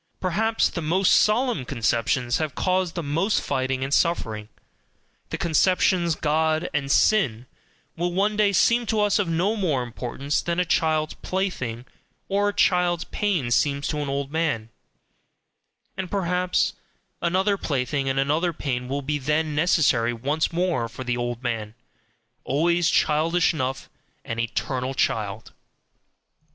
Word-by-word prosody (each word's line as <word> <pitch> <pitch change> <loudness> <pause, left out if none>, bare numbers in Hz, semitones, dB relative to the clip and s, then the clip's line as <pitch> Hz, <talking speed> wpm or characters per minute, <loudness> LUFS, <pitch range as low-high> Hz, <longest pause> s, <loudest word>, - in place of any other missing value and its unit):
Perhaps 220 +5 +1
the 170 - -5
most 180 +5 +2
solemn 230 - +3
conceptions 120 0 0
that - - 0
have 150 - -10
caused 185 -2 0
the 170 - -3
most 165 +9 +1
fighting 130 -1 -1
and 135 +1 -2
suffering, 110 -12 0 0.8
the - - -3
conceptions 170 0 +2
"God" 155 +2 0
and 140 -2 -1
"sin," 130 - +3 0.5
will 175 +1 -1
one 200 +4 +1
day 210 -1 +3
seem 235 +5 +3
to 220 +1 0
us 210 0 +2
of 200 - 0
no 175 +6 +1
more 160 - 0
importance 125 +4 -3
than 170 +1 -2
a 180 - +2
child's 155 -2 +1
plaything 130 -12 -3 0.4
or 200 +1 +2
a - - -4
child's 180 -2 +2
pain 180 -13 -1
seems 140 +4 +1
to 150 0 -2
an 145 -1 -3
old 140 0 -3
man; 150 -9 -1 1.3
and 190 -1 -4
perhaps 180 -1 0 0.5
another 190 +4 +2
plaything 140 -4 -1
and 135 - -1
another 155 +5 +1
pain 125 -4 -3
will 140 +2 -3
then 150 +2 0
be 150 - -4
necessary 150 -7 +2
once 140 +7 -1
more 170 -9 0
for 130 - -8
"the 125 -1 -1
old 120 0 -3
man" 110 -3 -3 0.7
always 170 +5 +2
childish 165 +3 +2
enough, 135 -3 -3 0.4
an 115 - -4
eternal 125 +3 -2
child! 110 -3 -1
155 Hz, 145 wpm, -24 LUFS, 130-180 Hz, 1.3 s, solemn